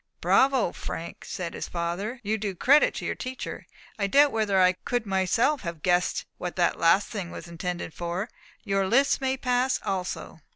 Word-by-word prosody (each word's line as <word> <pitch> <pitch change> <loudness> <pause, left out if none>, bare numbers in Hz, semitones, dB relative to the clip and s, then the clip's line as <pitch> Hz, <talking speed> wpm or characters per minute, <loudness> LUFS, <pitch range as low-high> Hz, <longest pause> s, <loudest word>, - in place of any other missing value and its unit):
"Bravo, 265 -8 +3
Frank," 165 - -7
said 175 -2 -5
his - - -5
father, 180 +8 -3
"you 215 +1 -1
do 200 -2 -3
credit 280 - +4
to - - -5
your - - -1
teacher. 255 0 -6 0.3
I 200 - +1
doubt 285 +7 +5
whether 210 -3 +1
I 185 0 +5
could 245 -2 -1
myself 200 +9 +1
have 170 -4 -6
guessed 180 -1 +1
what 180 -1 -4
that 175 - +1
last 180 +4 +4
thing 195 -6 -5
was 175 - -8
intended 170 -1 -5
for. 175 +4 -3 0.4
Your 195 -1 0
list 275 +7 +3
may 265 0 0
pass 250 0 +1
also. 185 -3 -3
195 Hz, 175 wpm, -26 LUFS, 175-245 Hz, 0.4 s, doubt